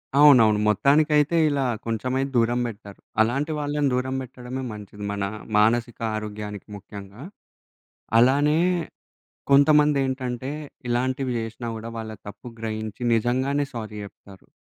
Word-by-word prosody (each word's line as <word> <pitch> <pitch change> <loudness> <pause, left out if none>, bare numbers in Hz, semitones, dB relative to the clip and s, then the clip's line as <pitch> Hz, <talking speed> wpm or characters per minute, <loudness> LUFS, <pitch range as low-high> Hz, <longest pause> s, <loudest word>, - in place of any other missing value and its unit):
అవునవును. 125 -8 +7
మొత్తానికైతే 150 - +3
ఇలా 140 -2 0 0.2
కొంచెంమైతే 125 +4 -1
దూరం 120 +1 +2
బెట్టారు. 100 -3 -10 0.2
అలాంటి 135 +8 +1
వాళ్ళని 145 -1 0
దూరం 130 +1 -1
పెట్టడమే 125 0 -7
మంచిది. 105 0 -10
మన 100 0 -2 0.3
మానసిక 115 +2 +2 0.2
ఆరోగ్యానికి 105 -1 -6
ముఖ్యంగా. 100 +3 -10 1.0
అలానే 145 +6 +4 0.9
కొంతమందేంటంటే, 140 -3 +3 0.4
ఇలాంటివి 130 +2 0
జేసినా 115 +1 -5
గూడా 110 +1 -6
వాళ్ళ 110 -1 -5 0.2
తప్పు 105 - -10
గ్రహించి 110 0 -5
నిజంగానే 130 +5 +1
సారీ 110 -3 -6
జెప్తారు. 100 -1 -14
120 Hz, 105 wpm, -24 LUFS, 110-140 Hz, 1.0 s, అవునవును